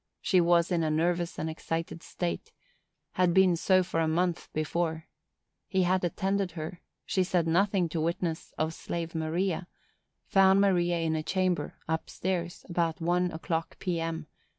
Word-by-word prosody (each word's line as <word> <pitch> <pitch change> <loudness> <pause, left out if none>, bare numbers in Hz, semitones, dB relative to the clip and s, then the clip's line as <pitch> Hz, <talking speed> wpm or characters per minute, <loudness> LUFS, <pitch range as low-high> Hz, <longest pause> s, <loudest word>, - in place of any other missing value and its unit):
She 185 -2 +3
was 170 +1 +3
in 170 -2 +2
a 160 - +1
nervous 170 +2 0
and 160 - -2
excited 165 +1 -4
state; 180 - -4 0.6
had 180 -1 +2
been 190 -2 +6
so 185 +2 +3
for 175 -2 -2
a 160 - +2
month 175 +2 0
before; 160 +1 -1 0.6
he 190 -1 +2
had 185 +1 +2
attended 190 +1 0
her; 165 +1 -6 0.2
she 190 - +1
said 180 -2 +1
nothing 185 +2 +2
to 160 0 -2
witness 165 0 -2
of 160 +1 0
slave 165 0 -4
Maria; 170 +3 -1 0.6
found 195 0 +5
Maria 175 -3 +3
in 165 -1 0
a 155 - 0
chamber, 185 +2 0
up 160 0 -2
stairs, 175 -2 -3
about 170 -1 0
one 175 +1 +1
o'clock, 165 0 -3
P. 180 -3 -2
M. 165 -1 -3
170 Hz, 160 wpm, -29 LUFS, 165-185 Hz, 0.6 s, been